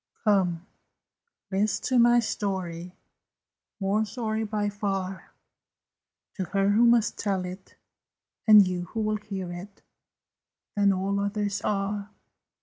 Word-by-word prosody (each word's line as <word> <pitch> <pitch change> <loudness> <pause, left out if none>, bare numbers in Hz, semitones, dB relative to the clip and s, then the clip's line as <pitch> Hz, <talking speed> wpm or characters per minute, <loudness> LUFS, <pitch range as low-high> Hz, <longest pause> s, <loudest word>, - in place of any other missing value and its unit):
Come, 185 -5 +2 0.9
list 200 +2 0
to 255 -2 +3
my 240 0 +6
story, 180 -5 -4 0.8
More 200 +2 +1
sorry, 220 -1 -3
by 210 -1 -1
far, 195 -2 -3 1.1
To 190 - -2
her 195 +1 +1
who 225 +4 +5
must 235 -1 +3
tell 195 -3 -1
it, 185 +1 -9 0.7
And 210 -3 +8
you 180 -1 -3
who 220 +5 -4
will 215 0 0
hear 195 -4 -6
it, 195 +3 -10 0.9
Than 200 -1 +4
all 195 +1 -1
others 205 0 -1
are! 200 0 -2
200 Hz, 120 wpm, -27 LUFS, 190-215 Hz, 1.1 s, And